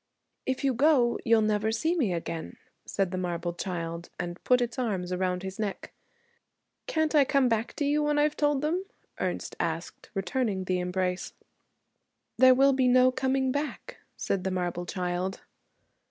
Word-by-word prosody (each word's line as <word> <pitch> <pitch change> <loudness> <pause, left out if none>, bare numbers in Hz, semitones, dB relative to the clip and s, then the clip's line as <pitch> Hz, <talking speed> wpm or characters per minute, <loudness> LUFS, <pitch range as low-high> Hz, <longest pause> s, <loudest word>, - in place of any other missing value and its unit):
'If 260 +1 -1
you 270 -1 +2
go, 250 -2 +3
you'll 225 -1 +4
never 215 0 +1
see 315 +10 +1
me 255 - +1
again,' 165 -1 -4 0.3
said 195 -3 -1
the 185 - -2
marble 175 -1 -2
child, 170 -1 -4
and 175 0 -5
put 250 0 +4
its 240 0 -2
arms 185 -7 -1
round 180 0 -1
his 190 +1 -6
neck. 205 -3 -4 0.9
'Can't 315 -1 0
I 295 -2 +6
come 270 -1 +3
back 225 -1 -1
to 290 - -1
you 295 +1 +2
when 295 0 +1
I've 295 0 +2
told 290 -2 +1
them?' 340 +5 0 0.4
Ernest - - -3
asked, - - -4
returning 195 +1 -1
the 185 0 0
embrace. 180 0 -2 1.1
'There 255 0 +8
will 275 +1 +5
be 260 -1 +2
no 255 +1 +5
coming 265 0 0
back,' 300 - -4 0.2
said 190 -2 -1
the 190 - 0
marble 175 -1 -2
child. 180 +1 -2
220 Hz, 165 wpm, -28 LUFS, 180-265 Hz, 1.1 s, There